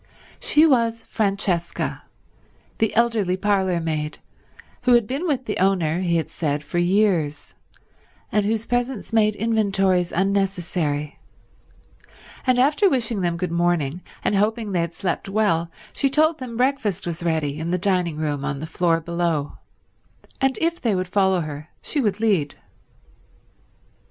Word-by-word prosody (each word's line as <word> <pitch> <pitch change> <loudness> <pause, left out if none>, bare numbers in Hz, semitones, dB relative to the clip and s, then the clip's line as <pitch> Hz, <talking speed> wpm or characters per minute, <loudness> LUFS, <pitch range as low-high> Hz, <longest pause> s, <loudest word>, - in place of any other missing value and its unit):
She 305 +2 +4
was 230 -6 +2
Francesca, 195 -6 -1 0.8
the 220 -1 +1
elderly 220 -6 +2
parlour 190 -3 +1
maid, 155 -2 -3 0.6
who 250 - +3
had 240 -2 +5
been 275 - -3
with 270 -5 -1
the 210 - -3
owner, 180 -4 +2
he 175 -2 0
had 160 - -3
said, 150 -2 -2
for 175 +4 -2
years, 175 -5 +1 0.8
and 210 - +2
whose 220 +2 -1
presence 245 -1 -2
made 215 -2 +3
inventories 195 -5 +1
unnecessary; 180 -6 -1 1.3
and 255 -1 +4
after 295 +10 +4
wishing 235 - -1
them 170 -1 0
good 180 0 -3
morning 170 -2 0 0.2
and - - +1
hoping 215 +1 0
they 175 -3 +1
had 170 0 -4
slept 190 0 -2
well, 195 -5 +1 0.2
she 275 - +1
told 310 +3 +2
them 245 -3 -6
breakfast 240 -7 0
was 170 0 -4
ready 155 -3 -1
in 160 +1 -3
the 180 - +1
dining 180 -4 +1
room 145 -3 -2
on 145 -1 -2
the 155 - -5
floor 165 0 +1
below, 170 -3 -2 0.8
and 270 -1 +2
if 335 +1 0
they 225 -5 +1
would 185 0 -1
follow 190 -2 +2
her 150 0 -7
she 295 - -1
would 210 -4 0
lead. 195 -10 +1
190 Hz, 145 wpm, -23 LUFS, 170-225 Hz, 1.3 s, had